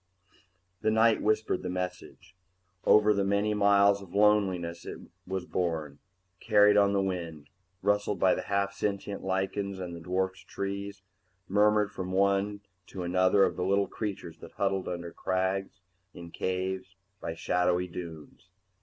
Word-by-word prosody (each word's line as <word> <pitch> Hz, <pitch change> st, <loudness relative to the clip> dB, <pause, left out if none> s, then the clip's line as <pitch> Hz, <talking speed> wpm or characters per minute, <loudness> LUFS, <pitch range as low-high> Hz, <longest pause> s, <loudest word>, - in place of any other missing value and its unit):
The 110 Hz, -, +2 dB
night 110 Hz, +1 st, +4 dB
whispered 110 Hz, -2 st, +1 dB
the -, -, -4 dB
message. 90 Hz, 0 st, -6 dB, 0.5 s
Over 105 Hz, 0 st, +6 dB
the 100 Hz, -1 st, 0 dB
many 100 Hz, +2 st, +1 dB
miles 100 Hz, -1 st, +4 dB
of 95 Hz, -1 st, -12 dB
loneliness 95 Hz, -5 st, +2 dB
it -, -, -7 dB, 0.3 s
was 95 Hz, -1 st, -3 dB
borne, 80 Hz, -5 st, -2 dB, 0.4 s
carried 105 Hz, -2 st, +5 dB
on 100 Hz, -1 st, +4 dB
the 100 Hz, -1 st, +2 dB
wind, 85 Hz, -6 st, -5 dB, 0.3 s
rustled 105 Hz, -1 st, +1 dB
by 95 Hz, -, +4 dB
the -, -, -2 dB
half 100 Hz, 0 st, -1 dB
sentient 100 Hz, 0 st, -3 dB
lichens 95 Hz, +1 st, -2 dB
and 90 Hz, -2 st, -6 dB
the -, -, -8 dB
dwarfed 95 Hz, +2 st, -2 dB
trees, 100 Hz, 0 st, -5 dB, 0.4 s
murmured 105 Hz, +1 st, +3 dB
from 95 Hz, -1 st, -5 dB
one 100 Hz, +1 st, +1 dB, 0.3 s
to 95 Hz, -, -6 dB
another 95 Hz, +2 st, +3 dB
of -, -, +1 dB
the 90 Hz, -, -2 dB
little 100 Hz, +2 st, +2 dB
creatures 100 Hz, -6 st, -6 dB
that -, -, -12 dB
huddled 95 Hz, -1 st, -1 dB
under 85 Hz, -1 st, -5 dB
crags, 95 Hz, +1 st, -2 dB, 0.3 s
in 85 Hz, -1 st, -10 dB
caves, 95 Hz, +1 st, -3 dB, 0.2 s
by 80 Hz, -, -5 dB
shadowy 90 Hz, +1 st, +1 dB
dunes. 85 Hz, -1 st, -9 dB
95 Hz, 145 wpm, -29 LUFS, 90-100 Hz, 0.5 s, Over